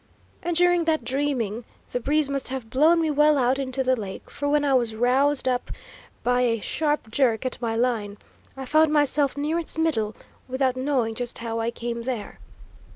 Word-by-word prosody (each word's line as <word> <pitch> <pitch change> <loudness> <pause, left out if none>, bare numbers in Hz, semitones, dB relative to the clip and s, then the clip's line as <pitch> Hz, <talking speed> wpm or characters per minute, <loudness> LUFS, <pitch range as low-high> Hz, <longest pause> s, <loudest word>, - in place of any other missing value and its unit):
And 345 0 -2
during 355 -1 +3
that 320 -1 +1
dreaming, 255 -5 -1 0.3
the 245 - -1
breeze 295 +4 +1
must 275 -2 -2
have 255 -4 -6
blown 315 +7 +4
me 315 -1 +1
well 300 0 +4
out 260 +1 +2
into 265 0 -1
the 260 0 +2
lake, 200 -5 -8
for 285 0 -2
when 295 0 +2
I 275 - +2
was 235 -4 +1
roused 260 +5 +2
up 250 -1 0 0.5
by 245 0 +2
a 230 -2 +1
sharp 295 -1 -1
jerk 240 -1 +1
at 255 - -4
my 225 -1 -1
line, 225 -4 -1 0.4
I 265 - -5
found 310 +3 +3
myself 290 -2 +2
near 305 +4 0
its 330 - -5
middle, 225 -10 0 0.3
without 260 0 0
knowing 255 -4 0
just 240 +1 -4
how 230 -1 -4
I 225 +1 0
came 235 0 -4
there. 230 -4 -5
260 Hz, 190 wpm, -24 LUFS, 235-290 Hz, 0.5 s, blown